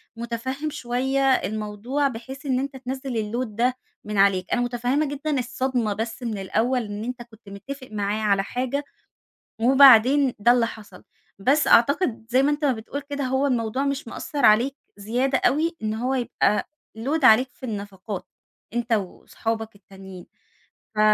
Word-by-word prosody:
مُتفهم 240 +6 -4
شوية 265 -1 -1
الموضوع 215 +5 -1
بحيث 265 +4 -8
إن 260 -2 +1
أنت 275 0 -4
تنزل 260 +1 -5 0.2
الload 250 +2 -1
ده 235 +4 0 0.3
من 210 -1 -4
عليك. 195 -2 +3
أنا 245 - +2
مُتفهِّمة 245 +5 0
جدًا 290 0 -2
الصدمة 245 -3 -1
بس 225 +4 -5
من 220 -3 -3
الأول 230 +6 0
إن 205 +1 -6
أنت 250 0 -5
كنت 220 -3 -17
متّفق 260 +7 -8
معاه 210 +1 -2
على 200 -2 +2
حاجة، 255 +6 -2 0.8
وبعدين 265 +1 +6
ده 235 +4 +5
اللي 240 -2 +3
حصل، 210 -5 -12 0.4
بس 280 +8 +2
أعتقد 250 -1 +3
زي 255 +3 +3
ما 290 - +3
أنت 295 0 -1
ما 275 - +4
بتقول 230 +6 -6
كده 285 -1 -3
هو 265 +2 +1
الموضوع 245 +1 0
مش 275 -1 -2
مأثّر 285 +4 -2
عليك 235 +6 +4 0.2
زيادة 245 +6 0
أوي، 325 +3 +1
إن 215 0 -1
هو 250 +4 -1
يبقى 235 -4 0 0.3
load 285 +5 -1
عليك 255 +2 +6
في 260 - -10
النفقات 200 -2 -6 0.5
أنت 240 -1 -1
وأصحابك 220 +2 -3
التانيين، 190 -2 -12 0.7
ف - - +1
245 Hz, 155 wpm, -24 LUFS, 215-270 Hz, 0.8 s, وبعدين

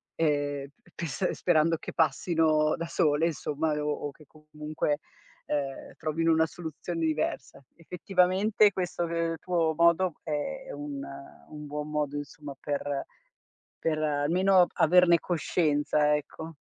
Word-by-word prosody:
e 145 -3 0 0.2
ps 170 +2 -2
sperando 165 -1 +2
che - - -8
passino 155 0 +2
da 170 - -4
sole, 160 -1 +2
insomma, 155 0 -2
o 150 - -1 0.2
o - - -7
che 150 +1 -19
comunque, 150 -1 -3 0.5
ehm, 140 -2 -3
trovino 165 +1 0
una 160 0 +4
soluzione 165 +1 -6
diversa. 150 -4 -2
Effettivamente 185 +5 +2
questo 175 -2 -2
ehm, 165 0 -1
tuo 165 -3 +1
modo 170 0 +3
è 220 - -3
è - - -7
un 145 -1 -6 0.5
un 150 -1 -8
buon 150 +1 -5
modo 150 -1 -1
insomma 145 0 -7
per 145 -1 -3 0.8
per 155 -1 +1
almeno 170 +5 +3
averne 175 +1 +5
coscienza, 150 -3 +1
ecco. 160 +2 -7
155 Hz, 125 wpm, -28 LUFS, 150-170 Hz, 0.8 s, averne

